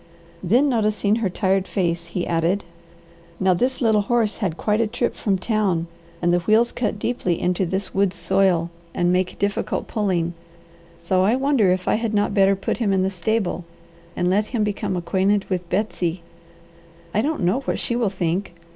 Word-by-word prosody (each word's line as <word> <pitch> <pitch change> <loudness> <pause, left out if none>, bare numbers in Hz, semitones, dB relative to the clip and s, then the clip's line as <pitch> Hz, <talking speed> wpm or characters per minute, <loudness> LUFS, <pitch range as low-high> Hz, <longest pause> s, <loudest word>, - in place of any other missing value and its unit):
Then 240 +11 +3
noticing 215 -4 +1
her 220 -5 0
tired 190 +1 0
face 170 -3 -1
he 175 +1 -3
added: 170 +4 0 0.8
"Now 190 -1 +3
this 250 +10 0
little 220 -3 +3
horse 225 0 0
had 180 -7 -2
quite 210 +1 +1
a 230 - +1
trip 235 +3 -1
from 195 -3 0
town, 190 -4 0 0.4
and 175 0 +3
the 175 - +3
wheels 220 +6 +3
cut 215 -4 -2
deeply 205 -6 -1
into 180 +1 0
this 190 +2 -3
woods 195 -1 +1
soil 185 -3 +1 0.2
and 175 0 +2
make 185 0 0
difficult 200 +1 -1
pulling, 180 -6 0 0.6
so 185 +2 +1
I 205 +6 +3
wonder 265 -7 +2
if 185 0 0
I - - +3
had 225 -2 -1
not 205 0 +1
better 195 -1 +4
put 195 - -2
him 215 -4 +1
in 190 -1 +2
the 190 - 0
stable 190 -1 -1 0.5
and 175 - 0
let 205 +4 +2
him 235 -4 -1
become 205 -2 -2
acquainted 195 +3 +1
with 180 -2 -2
Betsy. 180 -4 -1 0.9
I 215 - +2
don't 300 0 -1
know 185 +9 +2
what 275 - -2
she 235 - -2
will 235 -4 +1
think. 180 -1 -2
195 Hz, 180 wpm, -22 LUFS, 180-215 Hz, 0.9 s, better